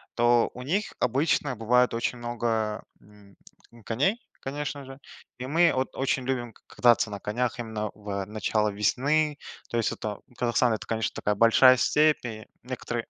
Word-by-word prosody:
то 120 0 +3
у 125 - -9
них 190 +11 -1
обычно 135 +2 +1
бывает 125 +3 +3
очень 120 +1 -2
много, 115 -2 -2 0.2
м, 100 -1 -19 0.4
м, 115 - -16
коней, 165 - 0 0.2
конечно 145 0 -5
же, 135 +1 -11 0.4
и 125 - -6
мы 165 +4 +4
от 130 0 -2
очень 135 -1 0
любим 120 -3 -2
к - - -23
кататься 120 -3 +4
на 100 - -5
конях, 120 +4 -2
именно 110 -2 -3
в 100 -2 -5
начале 105 0 -1
весны. 145 +8 +1 0.3
То 120 - -2
есть 115 - +1
это 105 -2 -5 0.2
Казахстан- 120 -1 +2
это 110 - -4
конечно 110 -1 -1
такая 105 0 -1
большая 120 +4 +6
степь 150 +2 +3
и 110 -2 -6 0.2
некоторые. 120 -2 -4
120 Hz, 165 wpm, -27 LUFS, 110-130 Hz, 0.4 s, большая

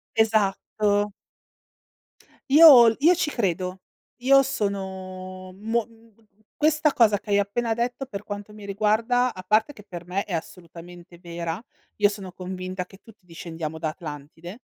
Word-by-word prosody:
Esatto. 210 -1 +1 1.4
Io 285 -6 +10
l 225 - +3
io 335 +5 +6
ci 325 -3 -1
credo. 185 - -2 0.4
Io 275 +2 +6
sono 190 -6 -5
mo 225 +3 -1
mhmm, 230 -1 -23 0.4
questa 305 0 +3
cosa 215 -4 +4
che 210 - -15
hai 200 - +3
appena 225 +3 -1
detto, 245 +3 -2
per 200 -4 -7
quanto 205 0 -7
mi 210 -1 -11
riguarda, 220 +5 +1
a 185 - -8
parte 215 +7 +2
che 210 -7 -14
per 175 -1 -8
me 190 +3 -1
è 200 - -6
assolutamente 170 +1 -9
vera, 170 +2 -5 0.3
io 205 -1 +4
sono 200 -3 -8
convinta 185 0 -6
che 195 - -16
tutti 210 -1 -20
discendiamo 165 -2 -6
da 160 -1 -2
Atlantide. 160 +4 -9
200 Hz, 145 wpm, -24 LUFS, 180-225 Hz, 1.4 s, Io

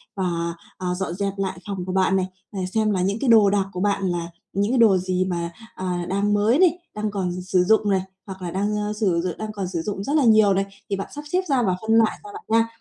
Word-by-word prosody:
và, 170 -3 -1 0.2
ờ, 180 -1 -2
dọn 190 -2 -3
dẹp 200 +1 -2
lại 190 -2 -3
phòng 195 -3 -4
của 185 - -3
bạn 190 0 +3
này, 190 -1 +1 0.3
à, 200 - -5
xem 215 -1 +2
là 190 -3 0
những 195 +3 0
cái 275 - 0
đồ 220 -3 +7
đạc 200 -1 +1
của 180 - -4
bạn 200 -1 +1
là 170 -1 -2 0.3
những 200 +3 +1
cái 260 - +2
đồ 215 -5 +6
gì 185 0 0
mà, 170 -2 -2 0.2
ờ, 185 - -5 0.2
đang 200 +2 +1
mới 215 +7 +3
này, 355 -2 +5 0.2
đang 210 0 -2
còn 180 -3 -2
sử 180 0 +2
dụng 215 +2 +3
này, 190 -1 +2 0.2
hoặc 190 -2 -9
là 175 -1 -4
đang, 205 +3 -1
ơ, 210 0 -2
sử 195 -6 +1
d - - -1
đang 215 0 -5
còn 200 -3 -4
sử 170 -2 -3
dụng 195 +2 -4
rất 280 - -2
là 300 - +4
nhiều 215 -3 +6
này, 195 +1 +1 0.2
thì 200 - 0
bạn 195 - -4
sắp 295 - -6
xếp 365 - +2
ra 265 -3 +3
và 185 -4 +1
phân 220 - -2
loại 225 -1 +3
ra 415 - -10
bạn 430 +1 -9
nha. 225 +1 +3
200 Hz, 270 wpm, -23 LUFS, 185-215 Hz, 0.3 s, đồ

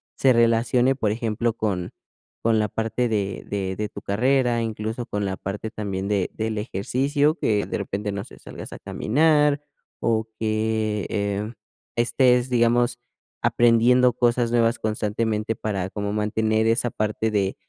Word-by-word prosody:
se 135 - +4
relacione, 115 +2 +3
por 110 -6 0
ejemplo, 115 +1 -1
con 95 -6 -2 0.5
con 115 -1 +3
la 105 - +1
parte 115 +3 -1
de 100 -3 -2
de 95 -2 -2
de 105 +2 -3
tu - - -9
carrera, 120 +3 +1
incluso 110 +1 -3
con 105 0 -2
la 95 -1 -2
parte 105 +4 -5
también 100 -3 -4
de 100 -3 0
del 110 0 -3
ejercicio? 135 +8 0
Que 105 - 0
de - - -3
repente, 100 +1 -3
no 100 0 -4
sé, - - -14
salgas - - -9
a - - -9
caminar, 150 +3 +2 0.4
o 110 -1 +1
que, 110 -1 0
em, 100 +1 -2 0.4
estés, 125 +1 +3
digamos, 120 0 +2 0.4
aprendiendo 120 +2 +4
cosas 120 0 +1
nuevas 115 0 +3
constantemente 110 0 -1
para 100 -4 -3
como 100 0 -3
mantener 110 +1 +1
esa 115 +2 +2
parte 110 0 -1
de 100 -2 0
110 Hz, 150 wpm, -24 LUFS, 105-120 Hz, 0.5 s, se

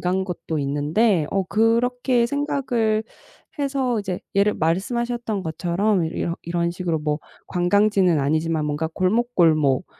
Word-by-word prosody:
간 185 +1 0
것도 165 -3 -4
있는데 150 +6 +1
어 195 - +1
그렇게 235 +4 +2
생각을 245 -6 0 0.6
해서 270 -4 0
이제 190 -3 -4 0.2
예를 205 +1 +3
말씀하셨던 220 +5 -1
것처럼 175 +3 0
이렇 170 +1 -3
이런 170 0 -1
식으로 175 -2 -2
뭐 150 0 -1 0.3
관광지는 185 -2 +2
아니지만 155 +2 0
뭔가 150 +2 -2
골목, 235 +7 0
골목 155 -3 +3
185 Hz, 295 characters per minute, -22 LUFS, 165-230 Hz, 0.6 s, 예를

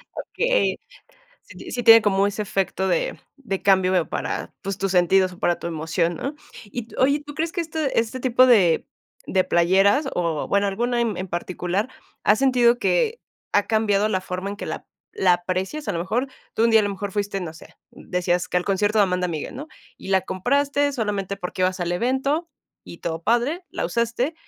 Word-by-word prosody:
Okey. - - 0 0.6
Sí - - -15
ti - - -9
sí 245 -1 -3
tiene 225 -1 +9
como 200 -1 +2
ese 205 +1 -2
efecto 190 -1 -1
de 175 -3 -1 0.4
cambio, 190 -2 +4
veo, 180 -3 +1
para, - - -4
pues, 195 0 -4
tus 195 -1 -1
sentidos 185 +1 +3
o - - -15
para 175 - +1
tu - - -5
emoción, 165 +1 -1
¿no? 275 - -4 0.3
Y 225 +3 -6
tú - - -14
oye, 280 +3 +3
¿tú 290 - -8
crees 325 +1 -1
que 350 - -2
este 315 -6 -1
este 230 +3 -2
tipo 255 0 +5
de 195 -10 +4 0.4
de 185 -1 +2
playeras 195 - +3
o, 165 -4 -1
bueno, 200 0 +2
alguna 240 +4 0
en 225 -5 -1
en 185 +1 -4
particular, 180 +5 -2 0.3
has 210 - +4
sentido 245 -3 +4
que 200 - +1 0.3
ha 205 - +3
cambiado 215 -2 +2
la 185 -3 0
forma 185 +1 -4
en - - -6
que - - -6
la - - -6 0.2
la 180 -2 +3
aprecias? 185 +12 -3
A - - +2
lo 165 - -2
mejor 235 +9 -1 0.3
tú 225 - +2
un 230 - +4
día, 220 - +7
a - - +2
lo 205 - -1
mejor 200 0 -5
fuiste, 200 0 -2
no 160 -3 -6
sé 160 - -15 0.2
decías 180 0 -2
que 180 - 0
al 180 - -1
concierto 205 +2 +1
de - - +7
Amanda 180 -1 0
Miguel, 160 +6 -5
¿no? 290 +4 -7 0.3
Y - - -11
la 190 -1 +3
compraste 280 +8 0
solamente 205 -4 -2
porque 180 0 -5
ibas 185 0 0
al 175 0 -1
evento 265 - 0 0.4
y 170 - -10
todo 165 -1 -4
padre, 280 +10 +1
la - - -3
usaste, 235 +6 -1
200 Hz, 205 wpm, -23 LUFS, 180-245 Hz, 0.6 s, tiene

